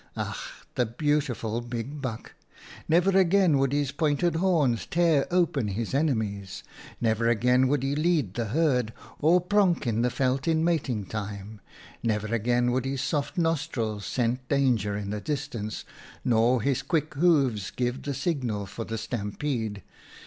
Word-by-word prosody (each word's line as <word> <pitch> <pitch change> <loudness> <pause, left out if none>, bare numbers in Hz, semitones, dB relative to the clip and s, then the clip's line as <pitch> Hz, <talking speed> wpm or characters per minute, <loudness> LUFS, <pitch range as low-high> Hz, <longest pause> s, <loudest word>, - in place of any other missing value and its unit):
11 - - -2
Ach! - - -9
the 125 - +1
beautiful 125 -3 -1
big 120 +4 -5
buck! 120 -5 -5 0.6
Never 175 +4 +4
again 185 -5 +4
would 135 -1 +2
his 145 -2 0
pointed 160 +2 +1
horns 160 -10 +2
tear 165 -4 +2
open 170 -9 +1
his 105 +4 -3
enemies! 110 -10 -1 0.4
Never 115 0 +1
again 125 +3 +3
would 140 0 +1
he 135 +1 0
lead 155 - +1
the 120 +1 -2
herd, 125 -2 +1 0.3
or 165 +4 +5
pronk 180 -3 +2
in 115 -1 0
the 125 - +2
veld 130 +3 0
in 160 -1 +2
mating 135 - 0
time! 105 0 -6 0.4
Never 110 -1 -1
again 120 +2 +2
would 130 +1 0
his 135 -1 -2
soft 145 +5 -2
nostrils 150 -11 -1
scent 125 +2 -1
danger 120 -8 +1
in 100 -1 -4
the 105 0 -3
distance, 135 -7 -4 0.4
nor 120 0 +3
his 140 -1 +1
quick 155 -3 -1
hoofs 140 - +2
give 125 +1 -2
the 140 -2 -3
signal 125 - -2
for 110 +4 -6
the 115 - -4
stampede 110 -1 -3
130 Hz, 155 wpm, -27 LUFS, 110-150 Hz, 0.6 s, or